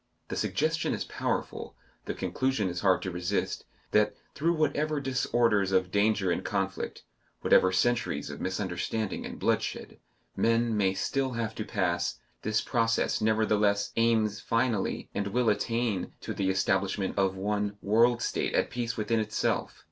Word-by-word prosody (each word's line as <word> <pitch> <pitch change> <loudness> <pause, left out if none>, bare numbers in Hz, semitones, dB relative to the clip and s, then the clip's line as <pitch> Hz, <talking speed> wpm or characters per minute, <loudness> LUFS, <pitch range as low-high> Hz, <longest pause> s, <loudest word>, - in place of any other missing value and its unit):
The - - -3
suggestion - - 0
is - - -3
powerful, - - -3 0.3
the - - -3
conclusion 130 -7 0
is 90 0 -4
hard 95 -2 +3
to 95 - -3
resist, 90 +3 -2 0.3
that, - - +3 0.2
through 165 +4 +1
whatever 155 -1 +1
disorders 120 -6 +1
of 95 -1 +2
danger 100 -2 +2
and 85 - -1
conflict, 95 -1 -3 0.4
whatever 95 - +5
centuries 120 +6 0
of - - -8
misunderstanding 95 +3 -2
and - - -8
bloodshed, - - -1 0.4
men 115 0 +2
may 95 -2 +2
still 130 +6 -1
have 115 -2 -2
to 110 - -4
pass, 85 -5 -1 0.2
this 110 0 +1
process 115 -2 +1
nevertheless 105 -2 +2
aims 110 -3 +2
finally, 115 -3 0
and 100 0 -1
will 115 +2 +2
attain 115 -2 -1
to - - -4
the 95 -1 0
establishment 95 0 0
of 95 -1 +1
one 105 +1 -1
world 115 +3 +4
state - - -1
at - - +1
peace 120 -1 -3
within 110 +1 +1
itself. 110 0 -1
105 Hz, 150 wpm, -29 LUFS, 95-115 Hz, 0.4 s, whatever